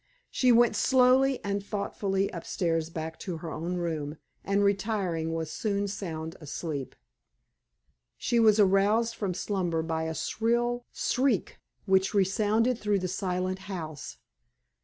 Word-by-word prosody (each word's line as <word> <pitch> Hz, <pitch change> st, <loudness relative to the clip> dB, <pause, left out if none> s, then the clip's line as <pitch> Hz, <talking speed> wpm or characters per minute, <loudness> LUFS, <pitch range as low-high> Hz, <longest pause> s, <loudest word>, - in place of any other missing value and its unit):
She 255 Hz, -1 st, +3 dB
went 235 Hz, -2 st, +5 dB
slowly 260 Hz, +3 st, +4 dB
and 200 Hz, 0 st, -2 dB
thoughtfully 200 Hz, -1 st, -1 dB
upstairs 165 Hz, -1 st, -2 dB
back 160 Hz, -1 st, -6 dB
to 180 Hz, -4 st, -4 dB
her 160 Hz, 0 st, -6 dB
own 170 Hz, +4 st, -3 dB
room, 160 Hz, -4 st, -3 dB, 0.3 s
and, 200 Hz, +1 st, +1 dB
retiring, 195 Hz, -5 st, 0 dB
was 165 Hz, -1 st, -3 dB
soon 200 Hz, -2 st, -1 dB
sound 165 Hz, -4 st, -5 dB
asleep. 150 Hz, -2 st, -5 dB, 1.2 s
She 235 Hz, -, +1 dB
was 220 Hz, -2 st, +5 dB
aroused 205 Hz, +4 st, +3 dB
from 195 Hz, -6 st, -3 dB
slumber 175 Hz, -5 st, -1 dB
by 160 Hz, 0 st, -2 dB
a 160 Hz, 0 st, -3 dB
shrill 240 Hz, +4 st, 0 dB
shriek 255 Hz, -6 st, 0 dB, 0.3 s
which 190 Hz, +1 st, +2 dB
resounded 215 Hz, +5 st, +2 dB
through 210 Hz, -2 st, +1 dB
the 185 Hz, -1 st, -2 dB
silent 185 Hz, 0 st, -2 dB
house. 155 Hz, -6 st, -6 dB
195 Hz, 130 wpm, -28 LUFS, 165-215 Hz, 1.2 s, went